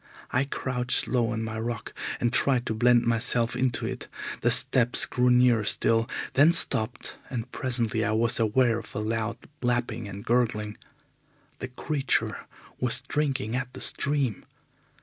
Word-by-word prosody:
I 130 +2 +1
crouched 125 -2 -2
low 120 -3 +1
on 110 -1 -3
my 110 0 -5
rock 115 0 -5 0.3
and 120 0 0
tried 125 -1 +3
to - - -2
blend 120 +2 +3
myself 115 0 +2
into 125 -2 -1
it. - - -5 0.3
The - - +2
steps 125 -2 +4
grew 125 0 +1
nearer 125 -3 +4
still, 115 +2 +1 0.2
then 155 +5 +5
stopped, 115 -7 +3
and 125 -1 -5
presently 120 -3 -1
I 110 - 0
was 115 +1 +2
aware 115 +1 +2
of 105 -2 -13
a - - -2
loud 115 +2 -2 0.2
lapping 120 -3 -1
and 100 +1 -9
gurgling. 110 -3 0 0.8
The 125 - -5
creature 135 +2 -2 0.3
was 125 +1 +1
drinking 135 -5 -2
at 125 0 -4
the - - -8
stream. 140 -7 0
120 Hz, 150 wpm, -26 LUFS, 115-125 Hz, 0.8 s, then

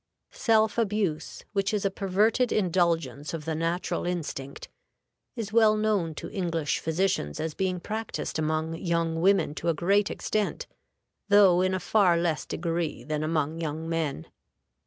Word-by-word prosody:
Self 220 -1 +2
abuse, 205 -7 -1
which 200 -1 +1
is 210 -2 -1
a 195 - +2
perverted 210 +6 +1
indulgence 165 -6 0
of 155 -2 -7
the 160 - -1
natural 170 +3 -1
instinct, 150 -6 -4 0.7
is 220 -4 -5
well 220 -2 +5
known 205 -7 0
to - - -7
English 170 -6 -1
physicians 160 - -1
as 160 -1 -2
being 185 0 -1
practiced 220 -4 -4
among 155 +1 -1
young 165 -2 -1
women 195 -4 +3
to 170 +2 -2
a 165 - +1
great 200 +5 +2
extent, 215 -1 -2 0.6
though 195 -3 +6
in 185 0 +1
a - - -1
far 185 -4 +3
less 170 -2 -1
degree 165 -1 -2
than 150 0 -2
among 155 0 -1
young 160 0 -3
men. 160 - -2
175 Hz, 150 wpm, -27 LUFS, 160-200 Hz, 0.7 s, though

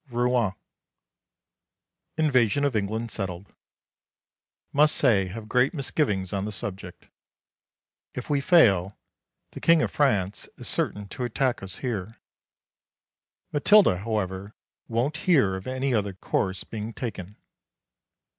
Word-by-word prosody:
Rouen. 120 -4 +1 1.6
Invasion 140 -3 +3
of 140 -4 0
England 110 +3 -2
settled. 95 -1 -6 1.2
Must 150 +2 +4
say 105 -8 +3
have 110 +4 -8
great 125 +7 +2
misgivings 105 - -1
on 100 0 -1
the 105 - -4
subject. 95 -3 -8 1.1
If 125 - -5
we 145 -2 +1
fail, 105 - +4 0.5
the - - -8
King 165 -2 +5
of - - -1
France 105 -8 0
is - - -8
certain 105 -1 -1
to 125 - -5
attack 125 +1 0
us 95 -1 -6
here. 110 -3 -4 1.4
Matilda, 150 - +5
however, 100 -1 -3 0.3
won't 125 +7 -1
hear 135 - +4
of 95 +4 -7
any 130 +1 -1
other 100 -3 0
course 95 0 -2
being 110 +1 -6
taken. 105 -5 -6
110 Hz, 120 wpm, -26 LUFS, 95-130 Hz, 1.6 s, King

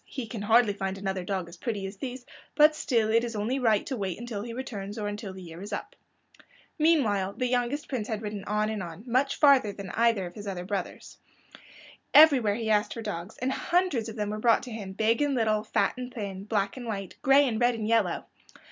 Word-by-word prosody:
He 260 -4 -5
can 220 -1 -6
hardly 220 0 +4
find 195 -1 -3
another 190 -1 -3
dog 185 -1 -3
as 170 +1 -12
pretty 205 -1 -3
as 195 +1 -7
these, 250 +1 -6 0.3
but 305 0 +6
still 230 -7 +1
it 230 +1 +3
is 235 -1 -4
only 225 +6 -1
right 220 -5 +2
to 270 - -3
wait 195 -5 -3
until 235 -4 -5
he 235 +2 -6
returns, 215 -4 -6
or 210 -1 -2
until 205 -1 -5
the 185 0 -10
year 165 0 -10
is 205 +2 -8
up." 205 - -5 0.8
Meanwhile 220 - +2
the 255 - -2
youngest 250 +4 -1
prince 240 -6 -3
had 220 -2 -3
ridden 205 -2 -5
on 210 +1 0
and 215 -2 -3
on, 175 +2 -8
much 260 +3 +1
farther 275 -8 +5
than 195 -1 -8
either 230 -4 +2
of 175 - -8
his 205 +1 -9
other 180 -2 -4
brothers. 195 -1 -5 1.0
Everywhere 270 -10 +7
he 225 0 -3
asked 210 0 +2
for 230 - -6
dogs, 190 -1 -5
and 255 +2 -1
hundreds 330 -8 0
of 220 - -8
them 210 -2 -2
were 215 - -4
brought 230 +1 +3
to 250 - -8
him, 205 -4 -6
big 220 +5 +1
and 290 -2 +1
little, 215 -3 +1
fat 220 - +1
and 250 0 -6
thin, 200 -4 -6
black 205 0 -1
and 245 -2 -7
white, 195 -4 -4
and - - -31
gray 275 +1 +5
and 225 -2 -2
red 240 0 +3
and 215 -2 -3
yellow. 225 -6 +1
220 Hz, 230 wpm, -28 LUFS, 200-245 Hz, 1.0 s, Everywhere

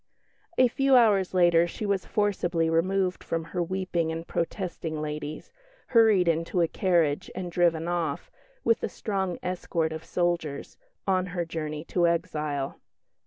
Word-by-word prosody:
A 255 - +6
few 270 +2 +3
hours 210 -6 +4
later 175 -1 +5
she 210 - -5
was 200 -2 -1
forcibly 175 -6 0
removed 185 +3 +1
from 165 0 -2
her 180 - 0
weeping 175 -2 -1
and 165 +1 -5
protesting 170 -3 -3
ladies, 150 0 -5 0.4
hurried 220 -7 +5
into 165 +2 +1
a 165 - +3
carriage, 170 -4 +1
and 180 -2 -4
driven 170 -1 +2
off, 170 -5 -2 0.3
with 230 - +2
a - - -2
strong 190 -4 -2
escort 170 -3 -1
of 160 0 -6
soldiers, 170 -5 -2 0.3
on 185 -1 +1
her 175 - 0
journey 155 -2 -4
to 175 0 +1
exile. 150 -4 -2
175 Hz, 145 wpm, -27 LUFS, 160-190 Hz, 0.4 s, A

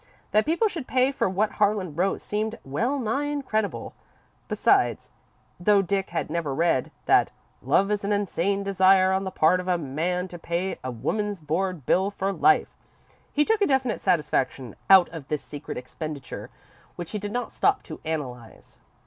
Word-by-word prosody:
That 215 +5 +3
people 340 +8 +2
should 330 -10 -6
pay 255 +1 +2
for 270 - 0
what 205 +3 0
Harlan 205 -5 0
wrote 185 +4 0
seemed 215 +2 -2
well 230 - -1
nigh 260 +3 -1
incredible. 260 -8 -2 0.5
Besides, - - +2 0.5
though 200 +2 +4
Dick 195 +1 -1
had 170 - -2
never 155 -5 -2
read 165 -5 +1 0.2
that - - +4 0.3
"love 200 +2 +2
is 205 -1 -1
an 200 - -1
insane 200 -1 0
desire 190 -1 +4
on 190 +1 0
the - - -2
part 180 0 +3
of 180 - -6
a 180 -1 +2
man 170 +5 -2
to 175 - -9
pay 170 +3 -2
a 130 - -3
woman's 200 - -2
board 165 0 -2
bill 190 +2 +2
for 195 -1 -2
life," 385 - +3 0.6
he 295 0 +2
took 445 -1 +1
a 400 - +4
definite 265 -3 +1
satisfaction 135 - 0
out 190 -2 +8
of 160 -5 -9
this 150 -1 -2
secret 145 0 -7
expenditure, 140 +2 -7 0.5
which 175 -2 -6
he 210 - -3
did 205 0 -5
not 245 +2 -3
stop - - +2
to - - -9
analyse. 130 -8 -6
190 Hz, 175 wpm, -25 LUFS, 160-210 Hz, 0.6 s, out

